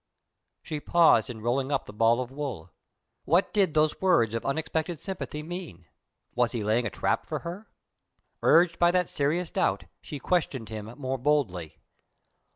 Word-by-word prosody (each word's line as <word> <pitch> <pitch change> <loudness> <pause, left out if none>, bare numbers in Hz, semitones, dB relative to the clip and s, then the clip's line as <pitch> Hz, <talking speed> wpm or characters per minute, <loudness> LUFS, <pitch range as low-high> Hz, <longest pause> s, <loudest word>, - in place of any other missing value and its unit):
She 155 - -4
paused 160 -9 +4
in 110 -3 -7
rolling 130 +4 0
up 135 -3 0
the - - -11
ball 115 +3 +3
of 125 0 -6
wool. 130 - -5 0.5
What 175 +5 +2
did 195 -7 +2
those 155 0 +2
words 170 - +3
of 115 - -2
unexpected 160 +2 -2
sympathy 180 -6 -5
mean? 165 - -8 0.5
Was 120 0 +1
he 115 -3 -2
laying 115 +3 +1
a - - -3
trap - - -1
for - - -4
her? 180 +6 -7 0.7
Urged 170 0 +4
by 175 - +5
that 180 0 +1
serious 160 +5 -1
doubt, 95 +1 0 0.2
she 150 - -7
questioned 140 -6 -1
him 110 -1 -6
more 135 -2 -3
boldly. 95 - 0
140 Hz, 165 wpm, -27 LUFS, 115-170 Hz, 0.7 s, by